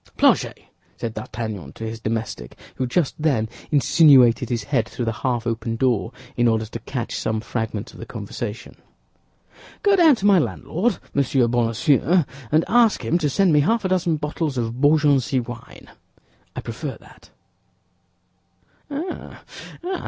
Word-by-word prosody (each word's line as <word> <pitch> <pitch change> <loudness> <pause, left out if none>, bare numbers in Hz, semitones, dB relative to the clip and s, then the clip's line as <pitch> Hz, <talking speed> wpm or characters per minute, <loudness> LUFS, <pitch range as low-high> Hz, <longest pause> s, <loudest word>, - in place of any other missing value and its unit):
"Planchet," - - +3 0.4
said 115 -1 -4
D'Artagnan 110 -8 -6
to - - -9
his 110 0 -5
domestic, 110 - -4 0.2
who 130 - -2
just 145 +3 0
then 130 -8 +1 0.2
insinuated 135 -5 +5
his 115 -3 -1
head 120 -3 0
through 120 - -4
the 115 - 0
half 120 -3 -1
open 115 0 -2
door 120 -2 0 0.2
in 120 0 +3
order 110 -1 +1
to 115 +2 -7
catch 120 +1 -5
some 110 0 -1
fragments 110 -2 -4
of - - -13
the 115 - -7
conversation, 110 +1 -6 1.1
"go 405 -1 +5
down 330 -6 +6
to 205 - -5
my 200 -3 +6
landlord, 185 +6 -1 0.2
Monsieur 135 -3 +2
Bonacieux, 125 +9 +2 0.3
and 155 +2 +3
ask 235 -2 +3
him 170 - +1
to 150 -3 0
send 180 +4 +3
me 150 - +5
half 215 +8 +1
a - - +1
dozen 175 -3 +1
bottles 150 -1 -3
of 120 +1 -3
Beaugency 145 -3 +3
wine; 120 -1 -9 0.7
I - - -4
prefer - - -6 1.9
that." 310 +6 -5
125 Hz, 145 wpm, -22 LUFS, 115-160 Hz, 1.9 s, down